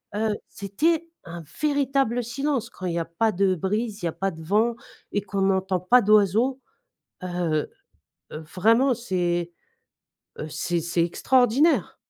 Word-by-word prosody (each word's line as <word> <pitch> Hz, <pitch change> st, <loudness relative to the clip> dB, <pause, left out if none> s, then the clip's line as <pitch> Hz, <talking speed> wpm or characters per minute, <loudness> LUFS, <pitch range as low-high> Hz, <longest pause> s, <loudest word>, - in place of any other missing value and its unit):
heu, 215 Hz, 0 st, 0 dB
c'était 320 Hz, -, -1 dB, 0.2 s
un 170 Hz, 0 st, -8 dB, 0.2 s
véritable 275 Hz, -5 st, +1 dB
silence 255 Hz, 0 st, -2 dB
quand 185 Hz, -, -9 dB
il 175 Hz, -, -1 dB
y 170 Hz, -, -1 dB
a 165 Hz, -, -2 dB
pas 215 Hz, +7 st, 0 dB
de 190 Hz, 0 st, +2 dB
brise, 210 Hz, +4 st, -2 dB
il -, -, -1 dB
y 170 Hz, -, +1 dB
a -, -, -4 dB
pas 195 Hz, 0 st, -2 dB
de 160 Hz, 0 st, -11 dB
vent 215 Hz, +8 st, +1 dB, 0.4 s
et 205 Hz, -, 0 dB
qu'on 200 Hz, -1 st, -3 dB
n'entend 190 Hz, -1 st, +1 dB
pas 245 Hz, +7 st, +5 dB
d'oiseaux, 215 Hz, +5 st, +3 dB, 0.6 s
heu 185 Hz, -, -3 dB, 1.0 s
heu, 155 Hz, -, -7 dB
vraiment, 230 Hz, +8 st, +4 dB
c'est, 175 Hz, -6 st, -2 dB, 0.9 s
heu, 155 Hz, -, -6 dB
c'est 170 Hz, +2 st, -2 dB
c'est 170 Hz, 0 st, 0 dB
extraordinaire. 255 Hz, -, +2 dB
205 Hz, 155 wpm, -24 LUFS, 180-245 Hz, 1.0 s, pas